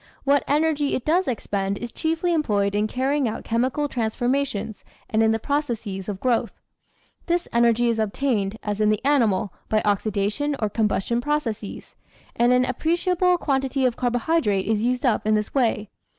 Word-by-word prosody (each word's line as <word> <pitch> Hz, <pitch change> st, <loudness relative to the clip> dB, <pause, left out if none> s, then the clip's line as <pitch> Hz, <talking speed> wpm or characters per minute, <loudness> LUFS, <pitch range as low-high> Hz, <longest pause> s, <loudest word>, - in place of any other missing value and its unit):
What 280 Hz, 0 st, +3 dB
energy 295 Hz, -1 st, +1 dB
it 255 Hz, -, -4 dB
does 350 Hz, +5 st, +2 dB
expend 200 Hz, -4 st, -2 dB
is 240 Hz, +2 st, -6 dB
chiefly 330 Hz, +2 st, -1 dB
employed 205 Hz, -11 st, +1 dB
in 210 Hz, +1 st, +1 dB
carrying 265 Hz, +3 st, 0 dB
out 220 Hz, -, -4 dB
chemical 255 Hz, +5 st, 0 dB
transforma 250 Hz, +3 st, 0 dB
tions 215 Hz, -3 st, -6 dB, 0.3 s
and 220 Hz, -, +2 dB
in 220 Hz, -, +4 dB
the 225 Hz, -, +2 dB
processes 225 Hz, -8 st, -3 dB
of 195 Hz, -2 st, -4 dB
growth. 245 Hz, -1 st, 0 dB, 0.7 s
This 345 Hz, 0 st, 0 dB
energy 235 Hz, 0 st, +3 dB
is 230 Hz, -1 st, 0 dB
obtained, 220 Hz, -2 st, -1 dB
as 210 Hz, 0 st, -2 dB
in 210 Hz, -, +4 dB
the 215 Hz, +4 st, 0 dB
animal, 220 Hz, -9 st, +2 dB, 0.2 s
by 215 Hz, -, +3 dB
oxidation 210 Hz, +7 st, 0 dB
or 215 Hz, -, -1 dB
combustion 225 Hz, +2 st, 0 dB
processes, 245 Hz, -8 st, -3 dB, 0.4 s
and 240 Hz, +1 st, +3 dB
an 250 Hz, 0 st, +4 dB
ap 255 Hz, -1 st, -4 dB
preciable 360 Hz, +2 st, +2 dB
quantity 270 Hz, -3 st, 0 dB
of 245 Hz, -2 st, +1 dB
carbohydrate 245 Hz, -4 st, 0 dB
is 215 Hz, +1 st, 0 dB
used 250 Hz, +2 st, 0 dB
up 220 Hz, -3 st, +1 dB
in 215 Hz, -, +4 dB
this 210 Hz, 0 st, -2 dB
way. 225 Hz, -5 st, +1 dB
240 Hz, 170 wpm, -23 LUFS, 215-285 Hz, 0.7 s, in